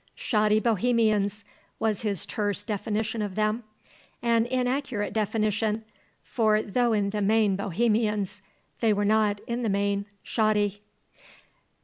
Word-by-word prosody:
"Shoddy 215 -1 +2
Bohemians," 215 -2 +1 0.3
was 220 -3 0
his 200 -5 -2
terse 205 -2 -1
definition 215 +1 -2
of 205 -3 -3
them; 215 +2 0 0.6
an 230 -1 +3
inaccurate 250 -3 -1
definition; 215 0 0 0.4
for 215 -2 +2
though, 240 +3 +1
in 205 -2 +1
the 210 0 -2
main, 210 -1 +3
Bohemians, 205 0 0 0.4
they 225 -2 +3
were 205 0 0
not, 210 -1 +2
in 235 +1 -3
the 225 - 0
main, 200 0 0 0.2
shoddy. 210 -2 +1
215 Hz, 120 wpm, -27 LUFS, 205-225 Hz, 0.6 s, an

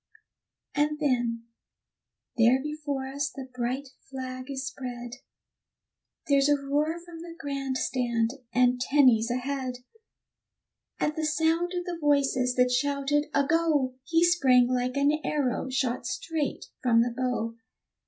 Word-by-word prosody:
And 300 +1 +1
then, 240 -5 0 0.9
there 240 +2 +5
before 290 -2 -4
us 280 +1 -2
the 270 -2 -8
bright 255 +3 -2 0.2
flag 255 0 -6
is 270 -1 -4
spread, 245 -2 -6 1.1
There's 280 0 +4
a 290 - +4
roar 295 +4 0
from 340 -2 -10
the 335 0 -9
grand 275 -3 -3
stand, 240 -3 0 0.2
and 250 +1 +3
Tenny's 250 -4 +4
ahead; 255 +1 -2 1.2
At 300 - 0
the 315 - -2
sound 325 +3 +1
of 355 - -3
the 345 -2 -4
voices 270 -4 +2
that 250 0 +3
shouted 285 +3 +1
"a 280 - +3
go!" 300 -4 +2
He 330 +3 +3
sprang 265 -8 +5
like 250 +1 -1
an 290 +2 +2
arrow 265 -3 -1
shot 255 -2 -1
straight 300 +3 -3 0.2
from 230 -2 +4
the 240 0 -3
bow. 245 -3 -1
270 Hz, 135 wpm, -27 LUFS, 250-295 Hz, 1.2 s, there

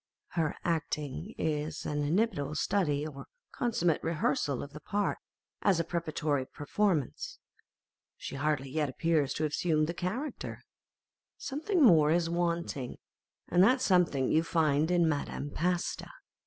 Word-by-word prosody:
Her 160 -4 -1
acting 160 +2 -2
is 150 -1 -2
an 150 0 -1
inimitable 155 -2 0
study 155 -5 +1
or 145 -3 -8 0.2
consummate 175 - +1
rehearsal 165 - 0
of 140 - -10
the 150 - -8
part 205 +5 -1 0.4
as 190 -4 +3
a - - +2
preparatory 155 -5 -1
per 145 - -9
formance: 175 - 0 0.8
she - - -7
hardly 140 -2 -1
yet 150 -1 0
appears 155 0 +1
to 155 - -1
have 155 - 0
assumed 155 -1 +2
the 170 - -3
character; 225 - -4 0.7
something 310 +5 0
more 160 - +7
is 165 +1 +2
wanting, 170 -6 -1 0.5
and 180 +2 +4
that 255 +6 +5
something 180 - +2
you 160 - +4
find 160 -2 +2
in 175 -2 +3
Madame 145 -1 -2
Pasta. 175 +3 -1
160 Hz, 140 wpm, -31 LUFS, 150-180 Hz, 0.8 s, more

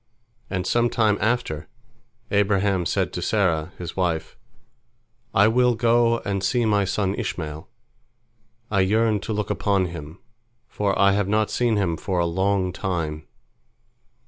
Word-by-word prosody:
And 90 -2 -2
some 120 +4 +2
time 110 -4 +2
after, 110 -9 -1 0.6
Abraham 100 -3 +2
said - - -1
to - - -4
Sarah, 85 -6 0
his 85 -2 -7
wife, 85 -4 -1 1.0
"I 105 -1 +5
will 125 +1 +3
go 115 0 +3
and 100 -1 -2
see 120 -2 +1
my 105 -2 +2
son 95 0 0
Ishmael; 80 -6 -5 1.0
I 100 - +2
yearn 110 +3 +2
to 100 - -6
look 105 -1 -2
upon 100 -2 +1
him, 85 -1 -8 0.5
for 100 -3 -1
I 100 0 +5
have 100 0 +1
not 105 +1 +1
seen 120 -2 +1
him 85 -5 0
for 95 +2 -3
a 85 - +2
long 95 +1 0
time." 80 -5 -3
100 Hz, 145 wpm, -23 LUFS, 90-110 Hz, 1.0 s, I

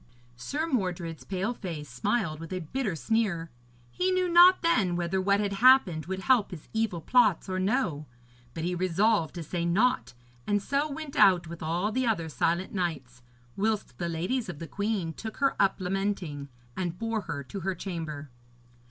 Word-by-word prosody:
Sir 285 - -3
Mordred's 180 - -2
pale 195 +5 -2
face 165 -10 -6
smiled 155 - -1
with 165 +1 -9
a 185 - -3
bitter 210 - -2
sneer. 175 -3 -1 0.4
He 365 +1 0
knew 370 -1 +2
not 350 +2 +7
then 200 - +2
whether 175 +2 -1
what 200 +1 +2
had 205 -1 -1
happened 195 - +5
would 190 +1 -3
help 245 -2 +3
his 170 -6 -10
evil 220 -6 -1
plots 215 -1 +3
or 185 0 -2
no; 185 - 0 0.5
but 160 - -4
he 180 +1 -1
resolved 185 0 +1
to 170 - -5
say 170 +2 -3
naught, 210 - +1 0.3
and 205 0 +2
so 280 +8 -1
went 300 0 -6
out 185 - +5
with 170 +1 -9
all 170 +6 -1
the 255 +2 0
other 170 -8 0
silent 170 +4 0
knights, 145 -10 -3 0.3
whilst 205 - -1
the 170 - -2
ladies 185 +9 -2
of 165 - -6
the 165 - -6
queen 200 -5 -2
took 220 +6 -7
her 275 0 +2
up 195 -1 +2
lamenting, 180 -6 -2 0.3
and 175 -2 -3
bore 225 0 -2
her 140 -7 -5
to 195 +9 -7
her 190 +1 -2
chamber. 160 -6 -6
190 Hz, 180 wpm, -28 LUFS, 165-225 Hz, 0.5 s, not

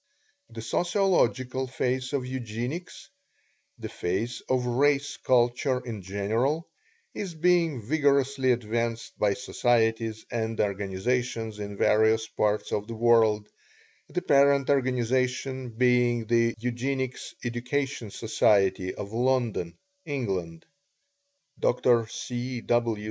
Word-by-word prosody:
The 115 -1 -8
sociological 130 - +1
phase 130 0 -2
of 140 -3 -1
Eugenics 130 +5 -5 0.7
the - - -6
phase 100 +7 -3
of 130 -1 +1
Race 140 +3 +1
Culture 125 +1 +2
in 110 -4 -5
general 110 - -1 0.5
is 185 -5 -5
being 165 -4 +2
vigorously 140 -1 +2
advanced 115 0 -2
by 100 -1 +2
societies 115 -3 0
and 115 -2 -2
organizations 105 +3 -1
in 100 -1 -6
various 110 +2 +3
parts 105 -1 -1
of 105 0 -2
the 115 - -6
world, 110 -2 +3 0.6
the 180 - -3
parent 140 -2 +4
organization 130 0 0
being 120 0 +2
the 115 +1 +2
Eugenics 130 +2 -3
Education 125 0 -2
Society, 95 -4 +1
of 100 +1 -7
London, 120 -8 0 0.3
England. 95 - -3 0.9
Dr. 120 -2 +3
C. 125 +1 -5
W. 115 -2 +1
120 Hz, 105 wpm, -27 LUFS, 110-130 Hz, 0.9 s, parent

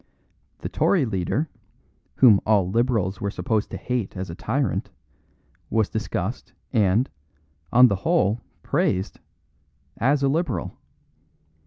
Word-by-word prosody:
The - - -3
Tory 175 -9 +2
leader, 110 - -1 0.7
whom 115 -7 +7
all 105 -4 +3
Liberals 110 -3 0
were 100 - -1
supposed 105 +2 -1
to - - -5
hate 125 -7 -3
as 95 -2 -4
a - - -7
tyrant, - - -1 0.8
was 110 -2 +1
discussed 110 0 -3 0.2
and, 110 +2 +3 0.6
on 125 +2 +8
the 100 -4 0
whole, 100 +3 +1 0.2
praised 95 +3 0 0.8
as 140 +3 +2
a - - +4
Liberal. 135 - -1
110 Hz, 120 wpm, -24 LUFS, 95-125 Hz, 0.8 s, on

